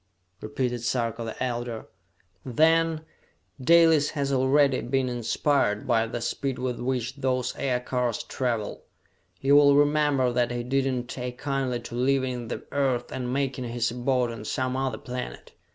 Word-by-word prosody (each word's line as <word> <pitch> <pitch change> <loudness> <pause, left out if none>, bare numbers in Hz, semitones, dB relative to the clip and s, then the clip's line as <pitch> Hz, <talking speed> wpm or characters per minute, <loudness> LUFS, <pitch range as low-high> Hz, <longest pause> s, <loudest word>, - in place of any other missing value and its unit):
repeated 120 +2 -2
Sarka 115 -1 -1
the 115 +2 -4
Elder. 120 -2 -3 0.6
"Then, 160 +4 +2 0.6
Dalis 165 -1 +5
has 140 -1 0
already 135 +1 +3
been 130 +1 0
inspired 120 -2 0
by 115 -1 +2
the 120 +1 -5
speed 130 +2 -2
with 125 -1 -3
which 125 +1 -2
those 130 -2 -1
aircars 125 -2 -1
travel! 115 -5 -3 0.6
You 140 +1 +4
will 140 -1 +7
remember 145 -3 +3
that 120 -1 +1
he 120 0 -3
did 135 +2 +1
not 125 -1 -3
take 125 -1 -5
kindly 135 -3 -2
to 120 - -9
leaving 130 -1 0
the - - -5
Earth 130 -4 0
and 125 -1 -3
making 135 -1 -1
his 120 -1 -1
abode 125 0 0
on 115 -2 -7
some 130 +3 -2
other 135 0 -1
planet! 125 - -7
125 Hz, 150 wpm, -26 LUFS, 120-135 Hz, 0.6 s, will